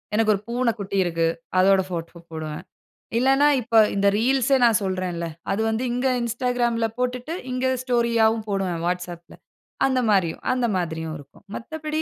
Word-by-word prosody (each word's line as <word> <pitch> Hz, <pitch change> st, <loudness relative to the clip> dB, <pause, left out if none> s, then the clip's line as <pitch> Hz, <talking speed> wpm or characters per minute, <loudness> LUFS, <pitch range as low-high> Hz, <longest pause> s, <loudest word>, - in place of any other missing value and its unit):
எனக்கு 215 Hz, 0 st, +3 dB
ஒரு 200 Hz, -, -3 dB
பூனை 240 Hz, 0 st, +1 dB
குட்டி 200 Hz, -1 st, -4 dB
இருக்கு. 165 Hz, -1 st, 0 dB, 0.3 s
அதோட 190 Hz, +1 st, +5 dB
போட்டோ 170 Hz, 0 st, -5 dB
போடுவேன். 155 Hz, +1 st, -6 dB, 0.5 s
இல்லன்னா 270 Hz, +3 st, +4 dB
இப்ப 230 Hz, 0 st, -4 dB, 0.2 s
இந்த 200 Hz, 0 st, +2 dB
ரீல்ஸ்ஏ 265 Hz, +3 st, +3 dB
நான் 230 Hz, -3 st, +5 dB
சொல்றேன் 185 Hz, -1 st, -2 dB
இல்ல. 170 Hz, 0 st, -3 dB, 0.3 s
அது 200 Hz, +3 st, 0 dB
வந்து 220 Hz, +3 st, -1 dB
இங்க 250 Hz, +2 st, 0 dB
Instagramல 235 Hz, -1 st, 0 dB
போட்டுட்டு 250 Hz, +4 st, -2 dB, 0.2 s
இங்க 255 Hz, +1 st, -1 dB, 0.2 s
ஸ்டோரி 240 Hz, -2 st, +1 dB
ஆவும் 220 Hz, 0 st, +1 dB
போடுவேன். 190 Hz, -4 st, -1 dB
WhatsAppல 175 Hz, -1 st, -4 dB, 0.5 s
அந்த 260 Hz, -1 st, +2 dB
மாரியும், 185 Hz, -5 st, +1 dB
அந்த 255 Hz, -1 st, +1 dB
மாரியும் 160 Hz, -3 st, -3 dB
இருக்கும். 140 Hz, +7 st, -17 dB
மத்தபடி 310 Hz, +4 st, -4 dB
220 Hz, 155 wpm, -23 LUFS, 180-250 Hz, 0.5 s, அதோட